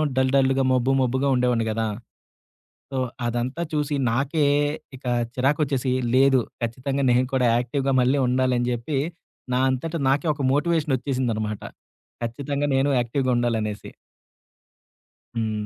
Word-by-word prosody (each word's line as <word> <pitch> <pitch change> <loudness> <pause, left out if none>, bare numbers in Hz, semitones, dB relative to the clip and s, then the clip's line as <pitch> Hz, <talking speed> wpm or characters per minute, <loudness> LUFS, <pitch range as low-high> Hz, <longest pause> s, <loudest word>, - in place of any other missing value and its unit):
Dull 130 0 +2
డల్‌గా 135 0 +3
మొబ్బు 130 +1 +2
మొబ్బుగా 130 +2 +1
ఉండేవాడిని 125 -2 +1
గదా! 110 0 -1 1.0
సో, 135 - -3 0.3
అదంతా 120 +7 -2
చూసి 150 -1 0 0.2
నాకే 145 +5 +1 0.5
ఇక 130 - -20 0.3
చిరాకోచ్చేసి 135 -1 +1 0.2
లేదు 135 -1 +5 0.2
ఖచ్చితంగా 135 +4 -2
నేను 125 +1 +3
కూడా 125 -2 +3
యాక్టివ్‌గా 135 +3 -1
మళ్ళీ 130 +3 +2
ఉండాలని 125 -1 +1
జెప్పి, 120 +4 -2 0.6
నా 125 - +2
అంతట 155 +6 -3
నాకే 140 +5 +1
ఒక 140 - -6
మోటివేషన్ 150 -1 +1
ఒచ్చేసిందనమాట. 115 -6 -2 0.6
ఖచ్చితంగా 140 +5 -2
నేను 135 +2 +2
యాక్టివ్‌గా 130 +2 0
ఉండాలనేసి. 110 -3 -2 1.5
హ్మ్. 110 -2 -2
130 Hz, 120 wpm, -24 LUFS, 120-140 Hz, 1.5 s, లేదు